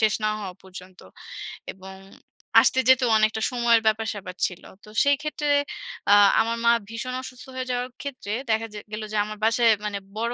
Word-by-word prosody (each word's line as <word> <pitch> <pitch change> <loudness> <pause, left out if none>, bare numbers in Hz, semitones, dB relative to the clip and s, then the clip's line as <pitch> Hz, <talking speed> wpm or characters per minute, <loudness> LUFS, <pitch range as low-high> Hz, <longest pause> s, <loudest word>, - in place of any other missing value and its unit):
শেষ 220 -1 +3
না - - +3
হওয়া 190 -3 -6
পর্যন্ত, 185 -1 -12 0.8
এবং 190 0 -11 0.7
আসতে 260 - +3
যেতেও 260 -2 +5
অনেকটা 220 0 +1
সময়ের 235 -2 +3
ব্যাপার-স্যাপার 215 -4 -1
ছিল। 180 - -11 0.2
তো - - -14
সেই 285 0 +4
ক্ষেত্রে 300 -1 -3 0.6
আ - - +9 0.3
আমার 230 +1 -1
মা 235 - +7 0.2
ভীষণ 235 +3 -5
অসুস্থ 255 -1 -10
হয়ে 255 0 -3
যাওয়ার 250 0 -2
ক্ষেত্রে 255 -7 -5 0.2
দেখা 220 +1 0
যে 210 - -6
গেল 215 +1 -4
যে, - - 0
আমার 215 0 -7
বাসায় 230 +1 +4
মানে 205 -1 -2 0.2
বড় 235 +2 -1
225 Hz, 175 wpm, -24 LUFS, 210-245 Hz, 0.8 s, আ